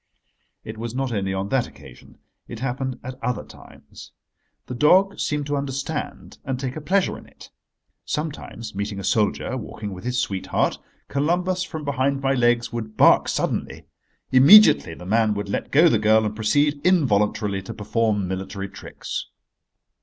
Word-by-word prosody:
It 110 0 -8
was 115 +1 -5
not 135 -1 -2
only 100 -3 -1
on 95 +1 -3
that 135 -3 +1
occasion. 60 -2 -16 0.3
It 120 - -8
happened 130 0 -3
at 130 0 -9
other 125 -3 -2
times. - - -15 0.5
The - - -6
dog 185 +9 +3
seemed 150 -1 -1
to 145 0 -2
understand 140 +2 -5
and 135 -3 -3
take 130 -1 -4
a 155 - -6
pleasure 190 +5 0
in - - -16
it. - - -16 0.5
Sometimes 145 -7 -5
meeting 100 0 -4
a - - -6
soldier, 105 +5 0
walking 105 -3 -7
with 90 - -10
his 125 +1 -1
sweetheart, 95 -6 -1 0.3
Columbus, 175 +6 0
from 160 -5 -5
behind 140 0 0
my 135 0 +1
legs, 120 -2 +1
would 110 -2 -6
bark - - +5
suddenly. - - -2 0.5
Immediately 135 - +7
the 90 - -11
man 110 +2 +2
would 100 0 -4
let - - -3
go 155 +5 +5
the 115 -9 +3
girl 110 0 +4
and 105 0 -3
proceed, 145 +7 +1
involuntarily, 105 - +2
to 95 - -9
perform 105 -2 -1
military 95 +1 -5
tricks. 95 - -7
125 Hz, 160 wpm, -23 LUFS, 105-140 Hz, 0.5 s, Immediately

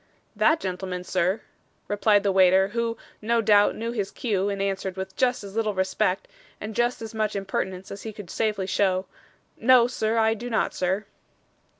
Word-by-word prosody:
'That 315 +1 +3
gentleman, 180 -1 -4
sir?' 185 +3 0 0.5
replied 205 0 +3
the 200 - +2
waiter, 190 0 +5
who, 230 +1 -2 0.2
no 230 +2 +1
doubt, 205 -2 +4
knew 230 +1 -3
his 205 -5 -2
cue, 205 -4 -1
and 200 -1 -3
answered 195 -1 -2
with 190 0 -5
just 250 -3 +1
as 200 0 -9
little 215 -2 0
respect, 190 0 0 0.3
and 215 +1 -6
just 240 -1 0
as 225 0 -7
much 215 -1 -1
impertinence 190 -1 -3
as 200 - -7
he 220 - -6
could 205 -5 -10
safely 210 -4 -1
show: 190 -1 +1 0.5
'no, 250 0 +6
sir, 230 -2 -1
I 220 0 +4
do 240 +2 -6
not, 220 - 0
sir. 190 +3 -1
205 Hz, 180 wpm, -25 LUFS, 190-225 Hz, 0.5 s, no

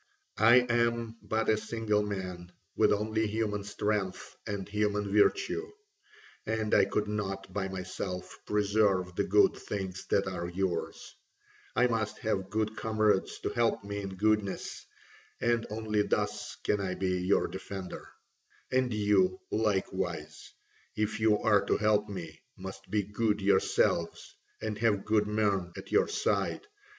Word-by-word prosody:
I 115 +3 +7
am 115 -1 +1
but 110 0 -1
a 110 - +4
single 110 -1 0
man, 90 -4 -5 0.2
with 110 - +4
only 110 +1 +1
human 105 -1 -1
strength 105 -1 -2
and 100 -2 -3
human 105 -1 0
virtue, 400 - +2 0.7
and 110 -1 -1
I - - +6
could 105 0 -1
not 95 -2 -4
by 95 -1 -1
myself 95 -1 -5
preserve 100 -3 +2
the - - +1
good - - +4
things 95 -2 -5
that 100 - +2
are 85 -2 -3
yours: 95 0 -3 0.6
I 125 - +4
must 110 -3 -1
have 95 -3 -2
good 110 +1 -1
comrades 110 -3 +1
to - - -1
help 115 -3 +1
me 100 0 -4
in 95 -1 -6
goodness, 105 0 0 0.5
and 120 -1 +1
only 105 -1 0
thus - - -1
can 105 - +1
I 95 -1 -2
be 90 -1 0
your 95 +2 +2
defender; 95 -1 -7 0.6
and 130 -1 +2
you 100 -3 +2
likewise, 95 -5 -2 0.4
if 105 0 -1
you 110 -1 +4
are 105 -2 +5
to - - +2
help 105 -1 +2
me, 85 -5 -7 0.2
must 95 0 -9
be 105 +1 +1
good 105 +1 0
yourselves 95 -3 +1 0.3
and 110 -1 -3
have 105 -3 +2
good 105 -1 +2
men 100 -4 +1
at - - -9
your 435 - +4
side. - - 0
105 Hz, 140 wpm, -30 LUFS, 95-110 Hz, 0.7 s, I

